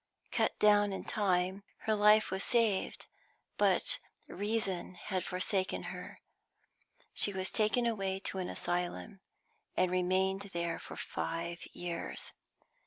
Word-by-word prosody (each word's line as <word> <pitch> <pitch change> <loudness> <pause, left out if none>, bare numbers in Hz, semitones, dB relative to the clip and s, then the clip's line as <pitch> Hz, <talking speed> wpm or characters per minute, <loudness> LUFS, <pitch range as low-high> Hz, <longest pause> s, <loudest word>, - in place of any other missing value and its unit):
Cut - - +1
down 205 -1 +5
in 190 - -4
time, 190 -1 +1 0.2
her 220 - +1
life 210 0 +5
was 190 +1 0
saved, 225 -5 +1 0.5
but - - +4 0.3
reason 205 -4 -2
had 185 0 -3
forsaken 185 +1 0
her. 180 - -9 0.9
She 205 - +3
was 190 0 -2
taken 220 +3 +2
away 195 -5 0
to 190 - -3
an 180 - -2
asylum, 175 +3 -2 0.6
and 185 - +3
remained 190 +2 +1
there 170 -1 -1
for - - -9
five 170 +1 -3
years. 175 -1 -5
190 Hz, 120 wpm, -33 LUFS, 180-205 Hz, 0.9 s, down